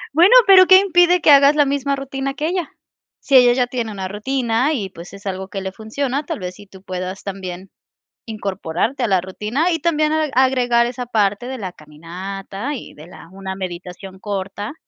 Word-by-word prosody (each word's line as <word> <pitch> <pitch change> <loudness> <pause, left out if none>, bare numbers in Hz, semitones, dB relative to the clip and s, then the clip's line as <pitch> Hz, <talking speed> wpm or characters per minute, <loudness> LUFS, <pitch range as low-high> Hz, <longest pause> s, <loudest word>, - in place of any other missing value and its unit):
Bueno, 360 +9 +6
pero 375 -2 +7
¿qué 375 - +9
impide 355 -2 +3
que 300 - +5
hagas 280 +1 +6
la 290 - +4
misma 280 0 -1
rutina 275 0 -5
que 300 - -3
ella? 355 -2 -2 0.5
Si 275 - 0
ella 250 -1 +7
ya 250 0 +1
tiene 240 -3 -4
una 190 -2 -5
rutina 235 +5 -1
y, 205 -8 -3
pues, 170 0 -11
es 200 0 -13
algo 190 -1 -4
que 195 +1 -6
le 190 - -5
funciona, 250 +7 -3
tal - - -5
vez 180 -2 -6
sí 205 +2 -15
tú 190 -1 -16
puedas 185 0 -6
también 185 -1 -7 0.5
incorporarte 205 +3 -3
a - - +1
la 190 -3 +2
rutina 215 - -2
y 325 - -1
también 310 -1 +1
ag 310 -2 0
agregar 250 -2 +3
esa 245 +1 -5
parte 215 0 0
de 260 0 -5
la 190 -6 -5
caminata 190 - -7
y - - -9
de 155 +2 -14
la 175 -2 -14
una 190 0 -7
meditación 185 +1 -8
corta. 200 +3 -5
220 Hz, 200 wpm, -19 LUFS, 190-275 Hz, 0.5 s, qué